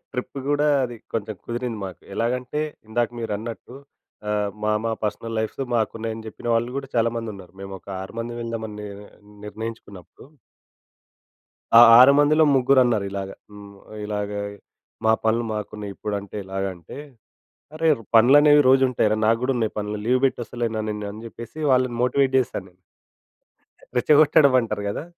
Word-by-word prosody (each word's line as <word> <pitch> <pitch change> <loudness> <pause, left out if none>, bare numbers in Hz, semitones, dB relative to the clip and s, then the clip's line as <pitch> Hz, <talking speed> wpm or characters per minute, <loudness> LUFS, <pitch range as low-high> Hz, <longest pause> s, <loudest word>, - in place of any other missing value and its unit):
Trip 125 +2 -5
కూడా, 145 +1 +2 0.2
అది 120 -1 -6 0.2
కొంచెం 110 -1 -3
కుదిరింది 120 -2 -4
మాకు. 90 - -10
ఎలాగంటే, 125 +5 -2 0.3
ఇందాక 120 +2 0
మీరు 115 - -3
అన్నట్టు 115 +3 -8 0.6
ఆహ్, 105 -1 0
"మా 105 - +1
మా 115 - 0
పర్సనల్ 115 +2 -3
లైవ్స్ 110 +4 -3
మాకు 110 -2 +1
ఉన్నాయి," 115 0 -3
అని 110 - -9
చెప్పిన 120 - -11
వాళ్ళు 120 +2 0
కూడా, 135 -1 -5
చాలా 115 0 +3
మంది 115 -1 -4
ఉన్నారు. 95 -2 -13
మేము 95 - -8
ఒక - - -22
ఆరు 95 - -10
మంది 120 +1 -4
వెల్దామని, 110 -3 -5
ని 105 - -13 0.4
నిర్ణయించుకున్నప్పుడు. 105 -3 -9 1.5
ఆ - - +11 0.2
ఆరు 130 +3 +9
మందిలో, 155 +2 +5
ముగ్గురు 130 0 +4
అన్నారు 110 -5 +1
ఇలాగ. 95 -1 -5 0.2
హ్మ్. 100 -1 -12 0.3
ఇలాగ 105 -1 -3 0.7
"మా 110 - +5
పనులు 115 +2 +2
మాకున్నాయి. 105 -1 -5
ఇప్పుడంటే 100 -1 -5
ఎలాగ" 95 0 -4
అంటే, 85 - -12 0.8
అరే 160 0 +2 0.3
పనులనేవి 145 +5 +7
రోజు 135 0 +5
ఉంటాయిరా, 110 -3 +1
నాకు 115 +1 +3
కూడా 135 - +1
ఉన్నాయి 110 -2 -2
పనులు. 105 0 -4
లీవ్ 125 +2 +3
పెట్టి 130 - 0
వస్తలేనా! 115 -2 -3 0.3
అని 110 +2 -10
చెప్పేసి, 115 +5 -11
వాళ్ళని 125 -2 +2
మోటివేట్ 130 +1 +2
చేశాను. 95 -7 -4 1.2
రెచ్చగొట్టడం 150 +1 +5
అంటారు 105 -3 -4
కదా! 100 - -4
115 Hz, 155 wpm, -23 LUFS, 105-125 Hz, 1.5 s, ఆ